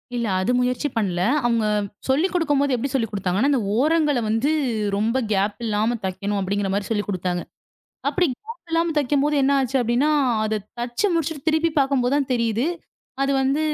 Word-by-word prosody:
இல்ல 235 -2 -1
அது 220 - +1
முயற்சி 250 +3 0
பண்ணல. 180 -5 0 0.2
அவங்க 230 -2 +2 0.4
சொல்லிக்கொடுக்கும்போது, 290 -3 +2
எப்படி 260 +3 -3
சொல்லிக்கொடுத்தாங்கனா, 210 0 0
அந்த 260 -5 +2 0.2
ஓரங்கள 300 -2 +2
வந்து 230 +8 +1 0.5
ரொம்ப 225 +5 +1 0.2
கேப் 200 +1 +1
இல்லாம 220 +2 0
தைக்கணும் 200 +2 -2
அப்படிங்கற 195 +1 -1
மாரி 200 -1 -1
சொல்லிக்கொடுத்தாங்க. 185 -4 -1 0.7
அப்படி 365 -2 +2
கேப் 450 - -12
இல்லாம 330 0 +1
தைக்கும்போது 290 +1 +1
என்ன 275 +1 +3
ஆச்சு 265 +1 -1
அப்படின்னா, 245 +6 +2 0.3
அத 215 -1 -1 0.2
தச்சு 240 +11 -1
முடிச்சுட்டு 320 -2 -2
திருப்பிப் 315 -1 +1
பாக்கும்போது 270 -1 +1
தான் 275 -2 -1
தெரியுது. 230 +2 0 0.6
அது 275 0 +1
வந்து 275 +3 +1
250 Hz, 150 wpm, -22 LUFS, 215-290 Hz, 0.7 s, என்ன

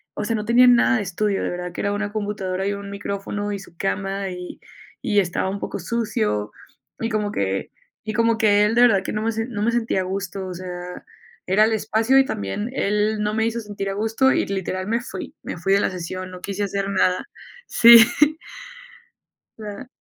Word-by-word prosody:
o 210 - -3
sea, 230 - 0
no 210 - -2
tenía 240 +3 +6
nada 245 +1 +5
de 215 - -1
estudio. 200 +2 -1
De - - -1
verdad, 180 0 -5
que - - -5
era 200 - 0
una 205 0 -2
computadora, 200 -3 -3
y 200 - 0
un 200 0 -7
micrófono, 200 +1 -4
y 200 - -4
su 185 -3 -15
cama. 195 0 -2
Y 180 -1 -8 0.4
y 205 - +2
estaba 180 +1 -2
un 200 +1 -4
poco - - -5
sucio, 105 - -1 0.5
y 225 - -1
como 210 -2 -1
que 95 - -2 0.3
y 215 0 -4
como 230 0 +2
que 210 -1 +4
él, 210 - +1
de 240 - +5
verdad 200 -6 +4
que, - - -4
no 215 - -2
me 225 +1 0
se 225 0 -2
no 215 -5 -5
me 225 +3 +2
sentía 235 -4 0
a - - -2
gusto. 190 0 -4
O 185 - -5
sea, 180 0 -7 0.4
era 200 +4 +4
el 225 - +1
espacio, 220 +4 +2
y 270 - +6
también 100 - -3
él, 210 -1 0
no 210 0 -1
me 220 +1 +1
hizo 230 +1 -1
sentir 205 -3 -5
a - - -2
gusto. 225 +6 +2
Y - - +1
literal, 190 -1 -3
me 230 +2 0
fui 195 -6 -8
me - - -5
fui 195 +3 +1
de 200 - +4
la - - +1
sesión. 185 +1 -6
No 180 - -9
quise 200 +1 -3
hacer 200 0 -2
nada. 185 -2 +1 0.4
Sí. 235 0 +9 1.6
O - - -8
sea 215 +5 -8
205 Hz, 220 wpm, -22 LUFS, 190-220 Hz, 1.6 s, Sí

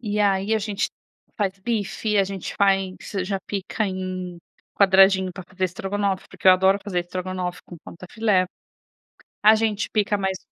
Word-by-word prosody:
e 210 -3 -2
aí 200 +1 +2
a 220 - +2
gente 205 0 -2 0.5
faz 195 -2 -1
bife, 210 0 -1
a 195 - +4
gente 195 -2 -6
faz 195 -2 +2 0.3
já 195 0 -1
pica 205 +2 -2
em 185 -2 -5 0.4
quadradinho 190 -1 +5
pra 185 0 -9
fazer 190 0 -3
estrogonofe, 195 +1 -2
porque 190 - +1
eu - - +10
adoro 190 +2 +4
fazer 190 -4 -1
estrogonofe 180 0 -4
com 175 - -11
contrafilé, 185 +1 0 1.0
a 215 +1 +8
gente 215 -1 0
pica 205 -1 +1
mais 190 -1 -1
195 Hz, 155 wpm, -23 LUFS, 185-205 Hz, 1.0 s, eu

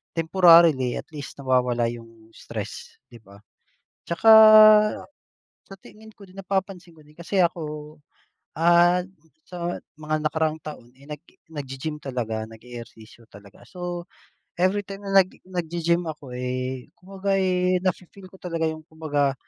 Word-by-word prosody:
temporarily. 165 -6 +5
At - - -10
least 145 -1 -9
nawawala 125 -3 +1
yung 115 -1 -14
stress, - - -8
'di 120 - -13
ba? 100 +1 -17 0.7
Tsaka, 170 +7 +2 1.4
sa 195 - -11
tingin 220 +1 -15
ko 200 - -15
din, 185 - -19
napapansin 190 -2 -4
ko - - -17
din, 150 - -21
kasi 180 +3 -3
ako, 155 -3 -4 0.6
ah, 175 +2 +4 0.4
sa 175 -1 -5 0.2
mga 155 0 -3
nakaraang 160 -1 -1
taon, 150 -6 -10
eh, 140 - -18
nag-e 150 +3 -11 0.2
naggi-gym 145 +2 -6
talaga, 115 -5 -4
nag-e-ehersisyo 115 0 -13
talaga. 100 0 -16
So, 175 -1 -6 0.5
everytime 195 +2 -1
na 195 0 +4
naggi 185 - -17
naggi-gym 170 -1 -1
ako, 150 -4 -8
eh, 130 +2 -4
kumbaga, 195 +1 -3
eh, 185 -1 +1
nafi-feel 185 +1 -5
ko - - -16
talaga 165 -2 -2
yung, 155 0 -9
kumbaga 145 -4 -1
160 Hz, 130 wpm, -24 LUFS, 130-180 Hz, 1.4 s, temporarily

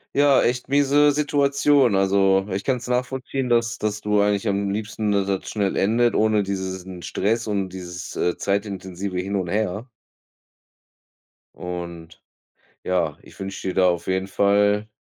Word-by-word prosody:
Ja, 140 -1 +5
echt 125 +2 -1
miese 145 +1 +4
Situation. 140 -4 +2
Also, 95 0 +3
ich 95 +1 -2
kann's 125 -2 -1
nachvollziehen, 125 +1 -2
dass 115 0 +1
dass 105 0 -2
du 105 -1 +2
eigentlich 105 +1 +1
am 100 0 0
liebsten, 105 +1 -2
dass 100 -1 +1
das 95 -1 -2
schnell 100 -3 -1
endet, 115 +4 +2
ohne 110 -1 +3
dieses 95 -1 -4
n 90 -2 -9
Stress 105 +7 -1
und 100 -3 -2
dieses, 90 -1 -8
äh, 90 - 0
zeitintensive 100 -2 -3
Hin 100 +2 -3
und 95 -3 -2
Her. 105 +3 -2 1.7
Und 85 -2 -7 0.6
ja, 85 -5 0
ich - - -17
wünsche 95 -1 -5
dir - - -3
da 95 -1 +4
auf 85 -1 -2
jeden 95 0 -1
Fall 100 +1 +2
100 Hz, 150 wpm, -23 LUFS, 95-115 Hz, 1.7 s, Ja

